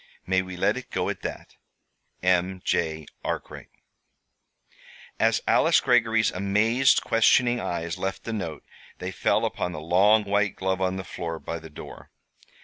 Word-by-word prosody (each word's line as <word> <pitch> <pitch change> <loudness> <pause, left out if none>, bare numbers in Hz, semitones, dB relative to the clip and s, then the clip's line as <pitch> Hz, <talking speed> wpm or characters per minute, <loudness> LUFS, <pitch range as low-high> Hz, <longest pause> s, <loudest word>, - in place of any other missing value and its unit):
May 95 +1 +2
we 95 -1 -8
let 105 +6 +1
it 130 - -8
go - - -1
at - - -4
that? - - -7 0.7
"M. 90 +1 +1
J. 80 -2 -1 0.2
ARKWRIGHT." - - -5 1.5
As - - +2
Alice - - +4
Greggory's 115 -2 +3
amazed, 110 +7 +2
questioning 120 +2 +3
eyes 85 -4 -3
left 95 0 -3
the 115 - -4
note 85 -8 -5 0.3
they - - -5
fell - - +1
upon 90 - -3
the 75 - -5
long 95 +7 +4
white 100 0 0
glove 95 0 -2
on 95 0 0
the 95 - -4
floor 85 -2 -5
by 85 +1 -6
the 80 0 -12
door. 75 - -11
95 Hz, 150 wpm, -25 LUFS, 85-110 Hz, 1.5 s, Alice